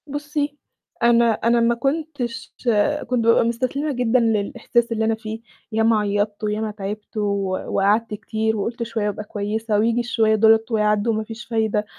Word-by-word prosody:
بُصّي، 290 0 -3 0.5
أنا 235 0 +5
أنا 235 +2 +2
ما 235 0 +3
كنتش 270 -3 -3 0.5
كنت 245 -1 0
بابقى 230 0 +5
مُستسلمة 255 +6 -1
جدًا 250 -1 +2
للإحساس 230 +1 0
اللي 220 -1 0
أنا 225 0 +1
فيه، 220 0 -7 0.3
ياما 220 0 +3
عيّطت 205 +1 -1
وياما 215 +1 -1
تعبت 210 +1 -7
و 210 - 0 0.4
وقعدت 210 +3 +1
كتير 220 +1 -2
وقُلت 230 +4 -3
شوية 225 -2 -2
وأبقى 210 +1 -3
كويسة 210 +1 -2
وييجي 230 +2 +2
الشوية 225 -2 +2
دُولة 220 +1 +6
ويعدّوا 210 +1 +2
وما 220 0 -1
فيش 225 +2 -9
فايدة. 220 -2 0
225 Hz, 155 wpm, -22 LUFS, 215-235 Hz, 0.5 s, دُولة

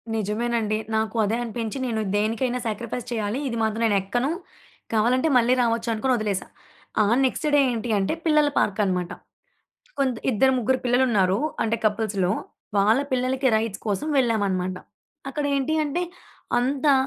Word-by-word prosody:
నిజమేనండి. 215 +1 -1 0.2
నాకు 220 +1 -1
అదే 220 +3 0
అనిపించి 230 +1 -4
నేను 220 -2 -1
దేనికైనా 230 +4 0
శాక్రిఫైస్ 235 +3 -4
చేయాలి 220 +2 -1
ఇది 235 -2 -3
మాత్రం 220 +1 -1
నేను 205 -2 +3
ఎక్కను. 245 +9 -1 0.6
కావాలంటే 250 +8 +2
మళ్ళీ 245 +1 +4
రావచ్చు 230 0 0
అనుకుని 255 +4 +1
వదిలేసా. 205 -3 -2 0.6
ఆ - - +2 0.2
నెక్స్ట్ 285 +4 -1
డే - - +6
ఏంటి 235 0 -3
అంటే 195 +10 0
పిల్లల 300 -2 +4
పార్క్‌కన్నామాట. 190 -4 0 0.9
కొంత్ 260 -4 +1
ఇద్దరు 265 +4 +3
ముగ్గురు 255 +2 +1
పిల్లలుంన్నారు 230 -6 +3 0.2
అంటే 225 +1 0
కపుల్స్‌లో, 205 -3 +1 0.5
వాళ్ళ 215 +6 +4
పిల్లలకి 260 +1 +1
రైడ్స్ 220 -2 -2
కోసం 210 +9 -1
వెళ్ళామన్నమాట. 195 -7 +1 0.5
అక్కడ 295 +1 -3
ఏంటి 275 +4 0
అంటే 320 +5 -1 0.6
అంతా 275 +3 +2
230 Hz, 135 wpm, -24 LUFS, 210-255 Hz, 0.9 s, డే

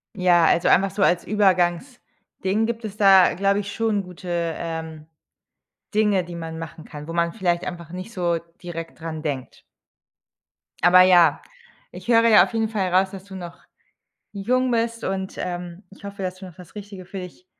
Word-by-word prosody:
Ja, 175 -3 +4
also 170 - +3
einfach 195 +2 +4
so 200 - 0
als 175 -1 +3
Übergangsding 195 +1 -1
gibt 230 0 -4
es 210 -1 -7
da, 195 -3 +7
äh, - - -6
glaube 200 +2 +1
ich 205 0 -5
schon 220 -2 0
gute, 180 0 -12 0.3
ähm, 160 -2 -6 0.9
Dinge, 210 -4 +2
die 175 0 -9
man 165 -1 -6
machen 165 -1 -8
kann, 150 -1 -10
wo - - -4
man 170 0 0
vielleicht 175 -4 -1
einfach 170 -3 -7
nicht 185 +6 -8
so 175 -3 0 0.2
direkt 165 -1 -7
dran 160 -1 -6
denkt. 140 -5 -5 1.2
Aber 180 +1 +7
ja, 175 -4 +5 0.5
ich - - -11
höre 230 -1 +5
ja 215 -2 +7
auf - - -5
jeden 225 -1 0
Fall 190 -5 -2
raus, 190 +1 +3
dass 195 -1 -10
du 195 -1 -11
noch 175 -2 -8 0.8
jung 250 +6 0
bist 230 0 -1
und, 190 0 -3
ähm, 175 +1 -5
ich 200 - -17
hoffe, 200 0 -7
dass 185 0 -3
du 190 0 -10
noch 180 - -12
das 180 +1 -15
Richtige 200 -2 -9
für 195 +2 -8
dich 180 0 -10
185 Hz, 185 wpm, -23 LUFS, 170-205 Hz, 1.2 s, da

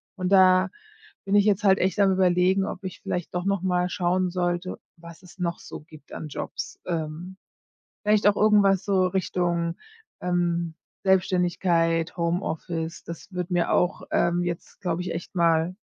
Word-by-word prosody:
Und 185 -1 -3
da 185 0 +6 0.6
bin 200 +1 +1
ich 205 -1 +5
jetzt 205 -1 +2
halt 190 -1 +5
echt 190 +3 0
am 195 -1 +5
Überlegen, 185 +1 +3
ob 195 - -6
ich 190 - -7
vielleicht 175 -2 -4
doch 180 - -2
noch 200 -2 0
mal 180 -1 0
schauen 180 0 0
sollte, 175 0 -2 0.2
was 170 0 -13
es 180 +1 -16
noch 170 -2 -2
so - - -9
gibt 155 -2 -16
an 155 - -6
Jobs, - - -6
ähm, 170 +2 -4 0.7
vielleicht 210 -1 +3
auch 205 0 +5
irgendwas 205 -3 +4
so 190 -3 +2
Richtung, 175 -2 -1 0.4
ähm, 175 -2 -1 0.3
Selbstständigkeit, 180 -3 +1
Homeoffice. 170 -1 -3
Das 170 +3 -9
würde 180 0 -4
mir 175 -1 +1
auch, 180 +2 +1
ähm, 175 +1 +2
jetzt, 175 -1 -6
glaube 175 -2 -2
ich, 180 -1 -4
echt 170 +3 -7
mal 170 0 +2
180 Hz, 160 wpm, -25 LUFS, 170-190 Hz, 0.7 s, da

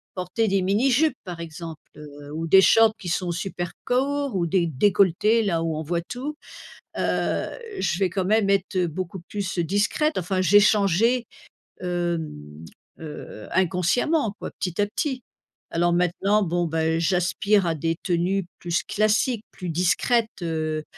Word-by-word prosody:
porter 190 +4 -1
des 195 -1 +2
mini 205 +8 +2
jupes, 290 +2 +3
par 175 -3 -7
exemple, 165 -1 -7 0.2
heu, 145 -1 -11
ou 165 +1 -3
des 190 +4 +7
shorts 225 +2 +5
qui 185 - -9
sont 175 0 -1
super 175 0 -4
courts, 275 0 0
ou 175 -2 0
des 170 0 +1
décolletés 200 - +3
là, 170 -5 0
où 160 -2 -2
on 155 - -3
voit 170 +2 -1
tout, 255 - -6 0.6
heu, - - 0 0.3
je 175 -2 0
vais 190 -2 +1
quand 190 +1 -1
même 210 +1 +2
être 190 -2 +1
beaucoup 185 +3 -5
plus, 190 +1 -5
heu, 170 - +2
discrète, 210 - +1
enfin 185 +1 -1
j'ai 190 +3 +6
changé, 215 +4 +3 0.6
hem, 160 - -4 0.3
heu, 150 -8 -9
inconsciemment, 195 - +1
quoi, - - -6
petit 180 -1 -3
à - - +3
petit. 255 +4 -3 0.5
Alors 175 +1 +2
maintenant, 190 +4 +2
bon, 175 0 0
ben, 160 0 0
j'aspire 185 +3 +2
à 165 - +1
des 165 +2 -1
tenues 180 +2 0
plus 170 -1 -1
classiques, 215 +2 +1
plus 180 - -6
discrètes, 185 +7 +1
heu 155 -1 -2
180 Hz, 155 wpm, -24 LUFS, 165-210 Hz, 0.6 s, des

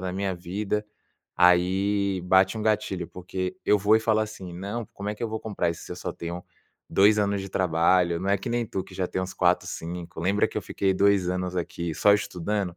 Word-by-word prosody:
da 95 -1 -3
minha 95 0 -1
vida, 100 +4 -3 0.5
aí 95 +2 +3
bate 95 +3 +4
um - - -3
gatilho, 105 -5 0
porque 90 +1 -5
eu 105 - +4
vou 105 +2 +4
e - - 0
falo 110 -1 +2
assim: 105 -4 -5
"Não, 100 +6 -4
como 100 +1 -6
é 105 - -2
que 105 - -10
eu 115 - 0
vou 110 - -3
comprar 100 -6 -1
isso 85 - -7
se - - -7
eu - - -7
só - - -4
tenho 85 +1 -6 0.5
2 105 +2 +5
anos 100 -1 +1
de 95 - -6
trabalho? 85 -1 +2
Não 95 - -3
é 100 - +4
que 95 - -6
nem 120 0 0
tu 95 - -3
que - - -16
já 95 - -1
tem 95 - -2
uns 95 - -5
4, 90 0 +2
5. 85 0 -6
Lembra 100 +4 +2
que - - -3
eu - - -6
fiquei 95 -1 0
2 100 -2 +3
anos 90 0 -2
aqui 85 -1 -3
só 105 - +5
estudando?". 100 -2 -2
95 Hz, 230 wpm, -26 LUFS, 90-105 Hz, 0.5 s, 2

